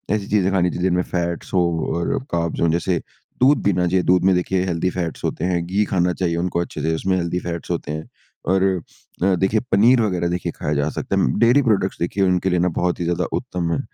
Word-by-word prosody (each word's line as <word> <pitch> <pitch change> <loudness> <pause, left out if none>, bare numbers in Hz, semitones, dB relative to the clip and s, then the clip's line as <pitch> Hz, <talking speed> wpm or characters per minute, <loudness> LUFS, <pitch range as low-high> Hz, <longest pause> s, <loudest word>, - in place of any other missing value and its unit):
ऐसी 100 -2 -4
चीज़ें 95 -2 +2
खानी 90 -2 +2
चाहिए 90 - -5
जिनमें 90 -1 +2
फ़ैट्स 85 0 -3
हों 85 -3 +1
और 85 - -1 0.2
कार्ब्स 85 -1 -1
हों 85 - +3
जैसे 85 +1 0 0.4
दूध 135 +3 +4
पीना 90 -3 +2
चाहिए 90 +1 +1
दूध 90 0 +3
में 95 - +5
देखिए 90 +1 0
हेल्दी 90 0 0
फ़ैट्स 85 -3 -4
होते 80 - -2
हैं 90 -2 0
घी 95 +4 +1
खाना 90 -2 +1
चाहिए 85 -3 -1
उनको 85 0 -1
अच्छे 85 - -4
से 80 0 0
उसमें 95 +3 0
हेल्दी 85 0 -1
फ़ैट्स 85 -2 -5
होते 75 - -3
हैं। 80 +1 -6 0.4
और 95 +1 +2 0.6
अ, 95 0 +3
देखिए 95 +4 +1
पनीर 115 +5 +5
वग़ैरह 90 -5 0
देखिए 90 +1 -2
खाया 75 - -2
जा 70 +1 0
सकता - - -3
है 65 - +2
डेयरी 120 +4 +5
प्रोडक्ट्स 105 -6 +1
देखिए 95 +3 0
उनके 90 0 +2
लिए 90 -1 +1
ना 90 - +2
बहुत 90 0 0
ही - - -1
ज़्यादा 85 0 0
उत्तम 85 -2 -3
है। 80 - 0
90 Hz, 230 wpm, -21 LUFS, 85-95 Hz, 0.6 s, में